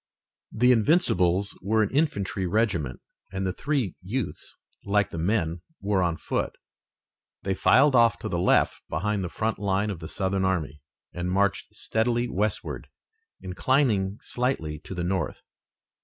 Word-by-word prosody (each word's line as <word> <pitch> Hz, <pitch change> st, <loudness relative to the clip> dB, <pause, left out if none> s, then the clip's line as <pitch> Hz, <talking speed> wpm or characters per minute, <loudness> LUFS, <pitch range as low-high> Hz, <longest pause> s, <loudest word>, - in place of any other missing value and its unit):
The 125 Hz, +3 st, +4 dB
Invincibles 100 Hz, -, +2 dB
were 110 Hz, +3 st, +2 dB
an 105 Hz, -, -2 dB
infantry 100 Hz, -, 0 dB
regiment 85 Hz, -, 0 dB, 0.3 s
and 95 Hz, 0 st, -2 dB
the 95 Hz, -, -1 dB
three 135 Hz, -, -1 dB
youths, 105 Hz, +4 st, -4 dB, 0.3 s
like 105 Hz, -1 st, +1 dB
the 85 Hz, -, -5 dB
men, 85 Hz, -2 st, 0 dB, 0.2 s
were 100 Hz, -1 st, +1 dB
on 85 Hz, -2 st, 0 dB
foot. -, -, -2 dB, 0.9 s
They 95 Hz, -, 0 dB
filed 130 Hz, +9 st, +5 dB
off 115 Hz, -3 st, +5 dB
to -, -, -3 dB
the 85 Hz, -, -1 dB
left 90 Hz, -, +3 dB
behind 100 Hz, +5 st, -1 dB
the 90 Hz, -, -3 dB
front 110 Hz, +3 st, -2 dB
line 100 Hz, +1 st, 0 dB
of 90 Hz, -, -6 dB
the 80 Hz, -, -8 dB
Southern 95 Hz, 0 st, -1 dB
army, 80 Hz, -7 st, -1 dB, 0.3 s
and 90 Hz, +1 st, -3 dB
marched 100 Hz, +1 st, 0 dB
steadily 120 Hz, +2 st, 0 dB
westward, 105 Hz, -1 st, -2 dB, 0.5 s
inclining 100 Hz, 0 st, +1 dB
slightly 100 Hz, -, -2 dB
to 95 Hz, -, -6 dB
the 90 Hz, -, -2 dB
north. 95 Hz, +2 st, -2 dB
100 Hz, 145 wpm, -26 LUFS, 90-115 Hz, 0.9 s, filed